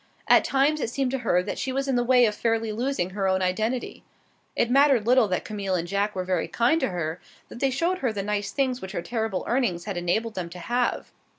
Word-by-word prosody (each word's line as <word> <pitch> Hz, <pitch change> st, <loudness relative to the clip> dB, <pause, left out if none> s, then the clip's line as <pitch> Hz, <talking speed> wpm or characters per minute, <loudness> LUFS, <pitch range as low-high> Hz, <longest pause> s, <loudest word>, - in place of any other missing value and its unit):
At -, -, +6 dB
times 280 Hz, +3 st, +1 dB
it -, -, -1 dB
seemed 260 Hz, +1 st, -1 dB
to 270 Hz, -, -1 dB
her 180 Hz, -7 st, +1 dB
that 205 Hz, -, -5 dB
she 265 Hz, -, -2 dB
was 275 Hz, +1 st, -2 dB
in 270 Hz, -, +1 dB
the 245 Hz, -, +2 dB
way 250 Hz, 0 st, +5 dB
of 210 Hz, -, +1 dB
fairly 225 Hz, 0 st, -1 dB
losing 230 Hz, -5 st, -2 dB
her 195 Hz, 0 st, -1 dB
own 190 Hz, 0 st, +1 dB
identity. 220 Hz, +7 st, -2 dB, 0.5 s
It 235 Hz, -, +1 dB
mattered 275 Hz, -4 st, +4 dB
little 250 Hz, -1 st, +4 dB
that 185 Hz, -2 st, -2 dB
Camille 200 Hz, -3 st, -2 dB
and 175 Hz, -1 st, -2 dB
Jack 200 Hz, +3 st, -1 dB
were 185 Hz, -, -2 dB
very 180 Hz, -3 st, -1 dB
kind 240 Hz, -, +2 dB
to -, -, +1 dB
her, 170 Hz, -1 st, -4 dB, 0.3 s
that -, -, -10 dB
they 275 Hz, -, +2 dB
showed 335 Hz, +8 st, 0 dB
her 255 Hz, -4 st, 0 dB
the 200 Hz, -2 st, -4 dB
nice 205 Hz, 0 st, -2 dB
things 255 Hz, -1 st, -1 dB
which 190 Hz, +1 st, -7 dB
her 170 Hz, -, -3 dB
terrible 220 Hz, -5 st, -2 dB
earnings 230 Hz, -9 st, 0 dB
had 200 Hz, -4 st, -4 dB
enabled 210 Hz, +6 st, -1 dB
them 180 Hz, -4 st, -4 dB
to 175 Hz, -, -10 dB
have. 240 Hz, +6 st, -1 dB
220 Hz, 240 wpm, -25 LUFS, 190-255 Hz, 0.5 s, At